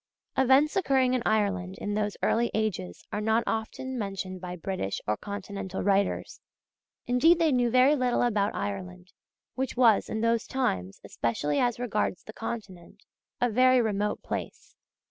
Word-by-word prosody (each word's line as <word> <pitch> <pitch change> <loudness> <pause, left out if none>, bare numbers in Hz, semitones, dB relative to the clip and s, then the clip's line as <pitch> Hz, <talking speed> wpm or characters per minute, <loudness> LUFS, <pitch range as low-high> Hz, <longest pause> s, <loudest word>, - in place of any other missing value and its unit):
Events 265 +3 +4
occurring 265 -8 +2
in 255 - +1
Ireland 195 -4 0
in 205 - -3
those 210 -1 -1
early 235 +1 +2
ages 200 - -2
are 210 - -1
not 220 +2 +2
often 245 +3 -3
mentioned 195 -3 -4
by 180 -1 -5
British 180 - -3
or 105 - +1
Continental 200 - -5
writers. 200 0 0 0.6
Indeed 300 +8 +4
they 330 -2 +3
knew 245 -2 +2
very 255 +4 +5
little 250 -3 +1
about 210 -4 +1
Ireland, 90 -3 -5 0.4
which 260 -1 -3
was, 230 -5 +4
in 220 - -2
those 230 0 +1
times, 95 - -2
especially 145 +6 -1
as 245 -2 +1
regards 210 -6 -1
the 215 - -10
Continent, 205 -4 -7 0.4
a 245 - +3
very 255 +2 +4
remote 210 -2 -1
place. - - -6
215 Hz, 150 wpm, -28 LUFS, 190-250 Hz, 0.6 s, very